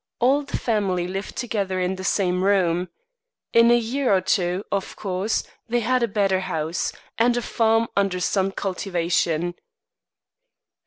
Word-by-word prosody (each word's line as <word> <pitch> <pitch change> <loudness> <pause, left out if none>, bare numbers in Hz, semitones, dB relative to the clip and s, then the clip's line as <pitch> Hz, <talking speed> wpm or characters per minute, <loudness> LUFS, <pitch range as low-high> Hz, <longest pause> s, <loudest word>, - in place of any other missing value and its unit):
All 265 +4 +3
the 285 -1 -4
family 195 -6 0
lived 195 +2 -5
together 200 -6 -2
in 180 +1 0
the 190 - -7
same 185 -1 +1
room. 180 -3 +2 0.6
In 230 0 +6
a 240 - +6
year 245 +3 0
or - - +4
two, 185 0 0
of 195 -1 -2
course, 195 +1 -1 0.2
they 240 +1 +1
had 255 +3 +1
a 235 - +2
better 195 -3 +1
house, 160 -2 -2 0.3
and 240 +1 +3
a - - 0
farm 225 0 +2
under 195 -2 +1
some 190 +1 +1
cultivation. 175 -3 -1
195 Hz, 150 wpm, -23 LUFS, 180-230 Hz, 0.6 s, In